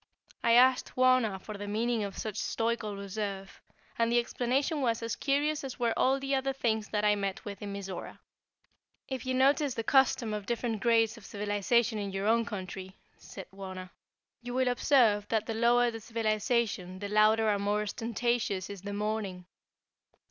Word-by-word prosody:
I 230 Hz, -, +4 dB
asked 255 Hz, +2 st, +4 dB
Wauna 255 Hz, -6 st, +3 dB
for 210 Hz, +1 st, -8 dB
the 205 Hz, -, -5 dB
meaning 225 Hz, +2 st, 0 dB
of 200 Hz, -2 st, -6 dB
such 215 Hz, -3 st, -4 dB
stoical 225 Hz, -1 st, -1 dB
reserve, 200 Hz, -1 st, -5 dB, 0.4 s
and 230 Hz, 0 st, +2 dB
the 240 Hz, -, +3 dB
explanation 260 Hz, +5 st, 0 dB
was 230 Hz, -3 st, 0 dB
as 230 Hz, -, -2 dB
curious 290 Hz, +2 st, 0 dB
as 265 Hz, -2 st, -6 dB
were 235 Hz, -1 st, +1 dB
all 265 Hz, +1 st, +2 dB
the 275 Hz, 0 st, -2 dB
other 270 Hz, 0 st, 0 dB
things 220 Hz, -5 st, -1 dB
that 210 Hz, -1 st, 0 dB
I 210 Hz, -, +5 dB
met 200 Hz, -2 st, -3 dB
with 200 Hz, -2 st, -7 dB
in 205 Hz, -1 st, -5 dB
Mizora. 195 Hz, -2 st, -6 dB, 0.9 s
"If 260 Hz, -2 st, -5 dB
you 260 Hz, -, 0 dB
notice 275 Hz, +1 st, +3 dB
the 225 Hz, -, -2 dB
custom 255 Hz, -3 st, +3 dB
of 210 Hz, -1 st, -5 dB
different 235 Hz, -3 st, -2 dB
grades 225 Hz, 0 st, +3 dB
of 230 Hz, -, -14 dB
civilization 210 Hz, +2 st, 0 dB
in 200 Hz, -1 st, -3 dB
your 195 Hz, +1 st, -3 dB
own 230 Hz, +1 st, +3 dB
country," 190 Hz, -2 st, -7 dB, 0.2 s
said 190 Hz, -, -10 dB
Wauna, 185 Hz, -1 st, -8 dB, 0.5 s
"you 245 Hz, 0 st, -6 dB
will 255 Hz, -1 st, +2 dB
observe 240 Hz, -5 st, +3 dB
that 220 Hz, -1 st, 0 dB
the 225 Hz, -, -3 dB
lower 240 Hz, +1 st, +3 dB
the 225 Hz, -, -7 dB
civilization 215 Hz, -4 st, -1 dB
the 205 Hz, +1 st, -5 dB
louder 215 Hz, +2 st, +4 dB
and 205 Hz, -1 st, +1 dB
more 205 Hz, +1 st, 0 dB
ostentatious 225 Hz, -3 st, -2 dB
is 200 Hz, -3 st, -8 dB
the 205 Hz, +1 st, -6 dB
mourning. 205 Hz, -3 st, -3 dB
220 Hz, 175 wpm, -30 LUFS, 205-245 Hz, 0.9 s, I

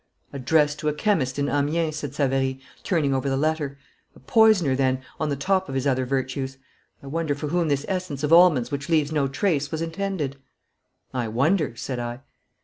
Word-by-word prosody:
"' -, -, -38 dB
'Addressed 150 Hz, +2 st, +2 dB
to 150 Hz, -, -3 dB
a 150 Hz, -, +2 dB
chemist 150 Hz, -, 0 dB
in 140 Hz, 0 st, 0 dB
Amiens,' 155 Hz, +2 st, 0 dB
said 145 Hz, -3 st, -5 dB
Savary, 135 Hz, -2 st, 0 dB, 0.2 s
turning 150 Hz, -7 st, +1 dB
over 135 Hz, +1 st, 0 dB
the 135 Hz, -, 0 dB
letter. 150 Hz, -1 st, -1 dB, 0.4 s
'A -, -, -16 dB
poisoner 215 Hz, -, +4 dB
then, 130 Hz, -1 st, +1 dB, 0.2 s
on 155 Hz, -, 0 dB
the 140 Hz, -, 0 dB
top 190 Hz, +6 st, 0 dB
of 135 Hz, -, -4 dB
his 135 Hz, 0 st, -1 dB
other 130 Hz, -2 st, +1 dB
virtues. 130 Hz, 0 st, -2 dB, 0.5 s
I -, -, -11 dB
wonder 155 Hz, +1 st, -1 dB
for 145 Hz, +1 st, -4 dB
whom 170 Hz, +1 st, +1 dB
this 140 Hz, -1 st, 0 dB
essence 180 Hz, -7 st, -3 dB
of 150 Hz, +2 st, +2 dB
almonds 165 Hz, -8 st, +6 dB
which 140 Hz, +3 st, -4 dB
leaves 155 Hz, -3 st, +2 dB
no 145 Hz, -3 st, +1 dB
trace 145 Hz, 0 st, 0 dB
was 160 Hz, -, -3 dB
intended.' 165 Hz, -5 st, -3 dB, 0.8 s
'I 125 Hz, -3 st, -1 dB
wonder,' 140 Hz, -, +1 dB
said 125 Hz, +1 st, -4 dB
I. 120 Hz, +1 st, -5 dB
145 Hz, 195 wpm, -24 LUFS, 135-160 Hz, 0.8 s, almonds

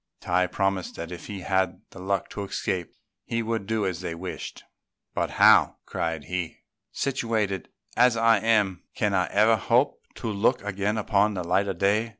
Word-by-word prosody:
Tai 90 Hz, +1 st, +1 dB
promised 95 Hz, 0 st, -1 dB
that 85 Hz, +1 st, -6 dB
if 85 Hz, -1 st, -8 dB
he 100 Hz, -3 st, -6 dB
had 95 Hz, 0 st, 0 dB
the -, -, -11 dB
luck 95 Hz, 0 st, -1 dB
to 100 Hz, -, -4 dB
escape 90 Hz, -3 st, -3 dB, 0.3 s
he 115 Hz, 0 st, -2 dB
would 110 Hz, -3 st, -2 dB
do 110 Hz, -2 st, 0 dB
as 90 Hz, -2 st, -2 dB
they 85 Hz, -2 st, -4 dB
wished; 90 Hz, +2 st, -7 dB, 0.5 s
"but -, -, -1 dB
how," -, -, +6 dB
cried 80 Hz, -2 st, -3 dB
he, 90 Hz, 0 st, -4 dB, 0.3 s
"situated 110 Hz, -8 st, -1 dB, 0.3 s
as 125 Hz, -1 st, +4 dB
I 115 Hz, -1 st, +4 dB
am, 105 Hz, -5 st, +2 dB
can 105 Hz, -2 st, 0 dB
I 90 Hz, -2 st, +2 dB
ever 110 Hz, +2 st, +4 dB
hope 120 Hz, +6 st, +2 dB
to 115 Hz, -, -5 dB
look 110 Hz, +3 st, +1 dB
again 105 Hz, +1 st, -1 dB
upon 105 Hz, 0 st, +2 dB
the 90 Hz, -, -2 dB
light 95 Hz, +4 st, +1 dB
of 95 Hz, -3 st, -3 dB
day?" 105 Hz, +5 st, +2 dB
100 Hz, 175 wpm, -26 LUFS, 90-110 Hz, 0.5 s, how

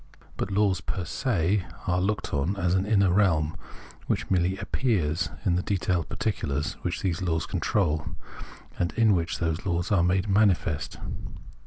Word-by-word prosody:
But -, -, -3 dB
laws 100 Hz, -2 st, +2 dB
pej 90 Hz, -, -3 dB
se 95 Hz, -, 0 dB, 0.2 s
are 90 Hz, 0 st, +1 dB
looked 100 Hz, +2 st, -1 dB
on 75 Hz, +8 st, 0 dB
as 90 Hz, -2 st, +1 dB
an 95 Hz, +2 st, +1 dB
inner 100 Hz, -4 st, +4 dB
realm, 80 Hz, -6 st, +2 dB, 0.5 s
which -, -, -1 dB
merely 95 Hz, +1 st, +2 dB
"appears" 95 Hz, -, 0 dB, 0.2 s
in 90 Hz, -3 st, +3 dB
the -, -, +1 dB
detailed 90 Hz, -3 st, -1 dB
particulars 75 Hz, -, -2 dB
which -, -, -3 dB
those 90 Hz, -3 st, 0 dB
laws 80 Hz, -3 st, 0 dB
control, 80 Hz, -6 st, 0 dB, 0.7 s
and 85 Hz, 0 st, 0 dB
in 110 Hz, -2 st, +4 dB
which 85 Hz, -2 st, 0 dB
those 80 Hz, -1 st, -1 dB
laws 85 Hz, -1 st, -1 dB
are 95 Hz, -4 st, +4 dB
made 90 Hz, +3 st, +2 dB
manifest. 95 Hz, -8 st, +2 dB
90 Hz, 155 wpm, -27 LUFS, 85-100 Hz, 0.7 s, inner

